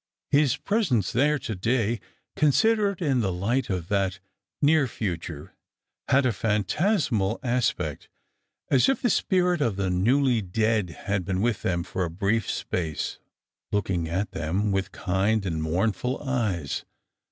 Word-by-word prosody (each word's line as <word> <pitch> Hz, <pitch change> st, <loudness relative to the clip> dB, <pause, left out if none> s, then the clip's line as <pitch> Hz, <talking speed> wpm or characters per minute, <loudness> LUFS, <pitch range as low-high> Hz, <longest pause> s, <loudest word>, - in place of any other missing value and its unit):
His 140 Hz, -3 st, +3 dB
presence 180 Hz, -, +1 dB
there 150 Hz, +5 st, +3 dB
to 130 Hz, -4 st, -4 dB
day, 115 Hz, +3 st, 0 dB, 0.4 s
considered 200 Hz, -, +2 dB
in 135 Hz, -5 st, +2 dB
the 100 Hz, -5 st, 0 dB
light 110 Hz, +8 st, -1 dB
of 90 Hz, -4 st, -2 dB
that 95 Hz, -2 st, 0 dB, 0.4 s
near 150 Hz, -1 st, +4 dB
future, 85 Hz, -9 st, -5 dB, 0.5 s
had 140 Hz, 0 st, +4 dB
a 125 Hz, -, +3 dB
phantasmal 110 Hz, -, +1 dB
aspect, 125 Hz, -1 st, -1 dB, 0.6 s
as 135 Hz, -, +5 dB
if 270 Hz, -, +1 dB
the 245 Hz, -, +3 dB
spirit 180 Hz, -5 st, +2 dB
of 115 Hz, -8 st, +1 dB
the 95 Hz, -2 st, -1 dB
newly 120 Hz, +6 st, +3 dB
dead 110 Hz, +1 st, 0 dB, 0.2 s
had 100 Hz, -1 st, 0 dB
been 95 Hz, 0 st, -2 dB
with 115 Hz, +1 st, 0 dB
them 85 Hz, -2 st, 0 dB
for 95 Hz, -, -3 dB
a 85 Hz, -, -2 dB
brief 100 Hz, +5 st, 0 dB
space, 80 Hz, -4 st, -3 dB, 0.5 s
looking 95 Hz, -5 st, -1 dB
at 95 Hz, +5 st, -2 dB
them 90 Hz, +6 st, -1 dB
with 95 Hz, -1 st, -1 dB
kind 100 Hz, +3 st, 0 dB
and 80 Hz, -4 st, -2 dB
mournful 100 Hz, +10 st, 0 dB
eyes. 110 Hz, -, -1 dB
110 Hz, 140 wpm, -26 LUFS, 95-135 Hz, 0.6 s, as